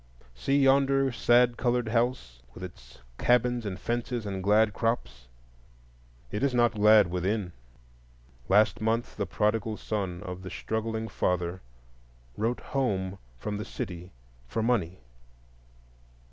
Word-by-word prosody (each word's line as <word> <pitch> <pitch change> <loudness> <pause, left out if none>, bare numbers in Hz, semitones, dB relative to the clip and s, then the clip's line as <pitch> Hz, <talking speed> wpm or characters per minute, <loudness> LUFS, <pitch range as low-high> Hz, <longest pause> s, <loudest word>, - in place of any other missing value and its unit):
See 135 - 0
yonder 135 0 +4
sad 120 0 +3
colored 120 -2 0
house, 115 - -1
with 90 - -9
its 65 -9 -11 0.2
cabins 120 -2 +2
and 95 -1 -5
fences 120 -1 -2
and 95 -2 -3
glad 105 +2 +3
crops! 65 - -2 1.0
It 105 - -3
is 140 -2 +1
not 120 -1 +4
glad 105 -3 +5
within; 90 +1 -1 1.0
last 105 +3 +4
month 115 +2 -1
the - - -2
prodigal 110 0 0
son 95 -5 -3
of 90 0 -6
the 95 - -7
struggling 110 +3 -3
father 90 -3 -1 0.7
wrote 115 +3 -1
home 100 -9 -2 0.2
from 105 +11 -4
the 105 - -4
city 90 0 -6 0.4
for 110 - -2
money. 100 -7 0
110 Hz, 125 wpm, -28 LUFS, 95-120 Hz, 1.0 s, glad